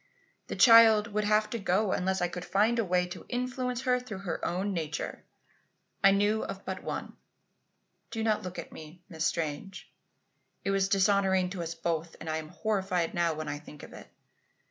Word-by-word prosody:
The - - -4
child 230 -2 +7
would 210 0 0
have 215 +1 +3
to 235 - -2
go 195 +1 +1
unless 190 0 0
I - - +2
could 175 0 -6
find 220 +6 +2
a - - +3
way 180 -2 +1
to 180 - -8
influence 250 0 -2
her 250 -1 +2
through 215 -6 -8
her 175 - -3
own 190 +3 -1
nature. 160 -3 -4 0.8
I 195 - +8
knew 205 +2 +2
of 195 - -7
but 190 - -4
one - - -5 0.9
do 225 - -3
not 215 -1 +1
look 180 -1 -7
at - - -7
me, 160 +3 -12
Miss 160 -2 -3
Strange. 165 +4 -4 0.7
It 195 - 0
was 195 0 +1
dishonouring 190 -2 +3
to 190 -3 -4
us 165 0 -4
both, 165 0 -3
and - - -9
I'm 155 0 -4
horrified 190 -5 -1
now 170 -2 +1
when 155 0 -5
I 145 - -4
think 150 -1 -13
of - - -11
it. - - -11
190 Hz, 190 wpm, -29 LUFS, 170-215 Hz, 0.9 s, I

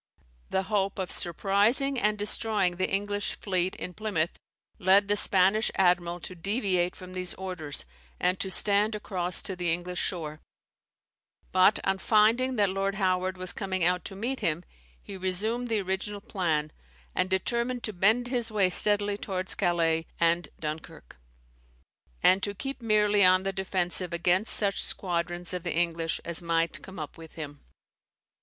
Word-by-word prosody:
The 190 - 0
hope 195 0 -1
of 190 -2 -3
surprising 210 - +1
and 210 -2 +1
destroying 205 -3 +1
the 185 - 0
English 205 +1 -2
fleet 185 -2 -1
in 180 - -6
Plymouth, 185 -5 -1 0.5
led 195 +2 +5
the 205 - +2
Spanish 195 +2 +4
admiral 175 -2 +2
to 185 - -6
deviate 185 -1 -1
from 185 0 -11
these 180 -1 -2
orders, 180 -6 -3 0.3
and 180 +1 +1
to 190 - -2
stand 205 +3 +4
across 185 -4 +1
to 190 - -3
the 175 -2 -1
English 175 +1 -3
shore; 155 -4 -4 1.1
but, 185 +3 +4
on 195 0 0
finding 230 +6 +3
that 205 -4 +2
Lord 195 +1 -1
Howard 185 -1 0
was 185 0 +1
coming 190 -3 -3
out 180 0 +2
to 195 - -6
meet 245 +7 -3
him, 165 +2 -1 0.4
he 195 - -8
resumed 210 +7 -1
the 220 -3 0
original 195 +2 -3
plan, 170 -8 -2 0.4
and 185 - 0
determined 235 +6 -1
to 215 - -2
bend 220 +7 +2
his 240 -3 -1
way 195 -4 +2
steadily 205 +1 +3
towards 185 -3 -1
Calais 165 -3 +1
and 170 -1 +2
Dunkirk, 150 - -7 1.1
and 190 +1 +5
to 205 +1 -2
keep 270 +4 -6
merely 210 -2 +3
on 185 0 +5
the 195 0 -2
defensive 185 -2 -1
against 180 +5 +1
such 200 -2 0
squadrons 175 -1 -1
of 180 - -3
the 175 -1 -3
English 165 -1 -1
as 170 0 -3
might 165 -1 -1
come 190 0 -11
up 155 +1 -7
with 160 -1 -12
him. 145 -2 -7
190 Hz, 160 wpm, -28 LUFS, 175-205 Hz, 1.1 s, led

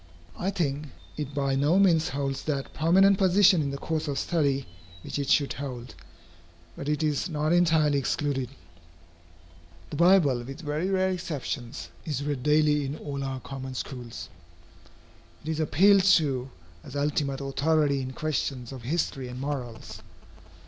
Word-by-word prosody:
I 185 - -2
think, 150 -6 -2 0.3
it 145 -2 -5
by 140 -1 0
no 145 +6 +3
means 170 -5 +4
holds 135 -1 -2
that 140 -3 -3
prominent 190 +5 +4
position 190 -2 +5
in 140 - -1
the 140 - -4
course 160 +2 -3
of 140 -2 -2
study 140 -5 0 0.4
which - - -4
it 140 - -2
should 140 -2 +3
hold. 125 -3 -6 0.8
But 140 - -5
it 150 +1 0
is 150 +3 0
not 155 0 0
entirely 160 -5 +3
excluded. 135 -2 -1 1.4
The 145 - -4
Bible, 170 -7 +5
with 135 +6 -8
very 155 +4 -2
rare 190 -1 +2
exceptions, 145 -8 -5
is 145 -3 -3
read 145 -3 -2
daily 150 +1 +3
in 140 +2 -4
all 140 -1 -5
our 135 -1 -4
common 130 0 -7
schools. 125 -2 -6 1.1
It 155 - -6
is 160 -1 -1
appealed 190 +6 +5
to 135 -5 0 0.3
as 135 - -10
ultimate 140 -1 0
authority 140 +1 +1
in 130 0 -5
questions 135 -4 -2
of 130 -2 -8
history 135 -1 -2
and 125 +1 -7
morals. 120 -6 -5
145 Hz, 150 wpm, -27 LUFS, 135-160 Hz, 1.4 s, position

